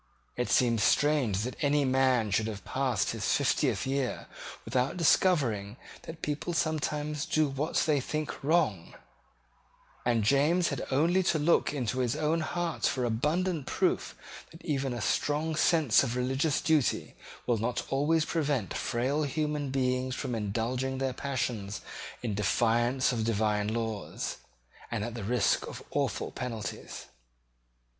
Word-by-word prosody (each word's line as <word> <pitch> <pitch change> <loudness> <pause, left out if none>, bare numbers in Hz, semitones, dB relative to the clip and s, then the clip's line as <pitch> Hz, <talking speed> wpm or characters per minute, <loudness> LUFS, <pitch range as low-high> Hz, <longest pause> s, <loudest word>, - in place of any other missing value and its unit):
It 125 -2 -2
seems 115 -3 +3
strange 135 -8 +3
that 125 +6 -4
any 145 0 +3
man 130 -4 +2
should 110 +3 +1
have 100 -4 -6
passed 130 -5 0
his - - -5
fiftieth - - +1
year 135 -1 -2 0.4
without 130 +7 0
discovering 130 - +2 0.3
that 160 0 -9
people 150 +4 -2
sometimes 150 -2 -1
do 155 -1 +2
what 140 +3 -3
they 150 -3 +2
think 155 +2 -4
wrong: 145 - +1 1.1
and 120 -3 +2
James 150 - +3
had - - -4
only 165 +7 +3
to 170 -3 +1
look 155 +3 +3
into 130 -3 -2
his 125 0 +1
own 155 +2 +1
heart 170 +1 -1
for 125 -2 0
abundant 150 +7 0
proof - - 0 0.3
that 165 - -15
even 140 -4 -1
a 120 -1 -4
strong 150 +7 0
sense 155 -6 +4
of 120 - -1
religious 130 +4 0
duty 155 -5 +1 0.3
will 120 -3 +1
not 115 +3 -1
always 155 +4 +2
prevent 145 - -1
frail 130 +5 -1
human 150 0 -1
beings 130 -1 0
from 130 -3 -3
indulging 120 +5 -2
their 135 -1 -1
passions 120 -7 -3 0.4
in 115 -4 -1
defiance 120 +5 +2
of 115 -3 -1
divine 105 -2 +1
laws, 110 -2 -3 0.5
and 110 -3 -2
at 120 +1 -4
the 115 -3 -6
risk 115 +1 +1
of - - -8
awful - - -1
penalties. 115 -5 -6
130 Hz, 140 wpm, -29 LUFS, 115-150 Hz, 1.1 s, sense